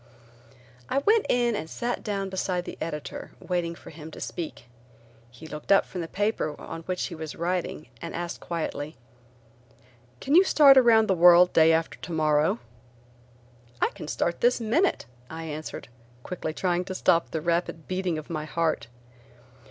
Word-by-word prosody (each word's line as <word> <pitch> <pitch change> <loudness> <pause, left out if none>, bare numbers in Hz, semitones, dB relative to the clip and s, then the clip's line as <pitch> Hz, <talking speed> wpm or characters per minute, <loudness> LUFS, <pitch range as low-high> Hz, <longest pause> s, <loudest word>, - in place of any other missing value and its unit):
I - - 0
went 425 +10 +3
in 240 -2 +2
and 160 -5 -5
sat 240 +6 -3
down 200 -2 -2
beside 185 -1 -2
the - - -7
editor 150 -2 -5
waiting 175 -2 -2
for - - -13
him 155 0 -10
to - - -11
speak. 160 -7 -6 0.6
He 125 +6 -13
looked 155 +3 -6
up 195 - +6
from 180 - -6
the 165 - -4
paper 205 -6 -1
on 165 - -7
which 185 -1 -1
he 180 - -6
was 160 -2 -6
writing 175 -2 -2 0.2
and 170 - -6
asked 170 0 -4
quietly: 160 -2 -4 1.2
"Can 275 - -2
you 360 +4 +8
start 290 -7 +7
around 230 -4 +6
the 190 - +3
world 175 0 +7
day 160 0 +6
after 165 0 0
tomorrow?" 155 -4 +1 1.2
"I - - +2
can - - -9
start 170 +2 -1
this 245 +1 +3
minute," 240 - +1 0.2
I 165 0 -6
answered, 155 -4 -6 0.4
quickly 175 -3 -4
trying 175 +2 0
to 185 - -5
stop 170 -2 +2
the 160 - -2
rapid 170 0 -1
beating 185 -3 -1
of 155 - -7
my 155 -2 -4
heart. 155 -5 -1
170 Hz, 165 wpm, -26 LUFS, 160-195 Hz, 1.2 s, you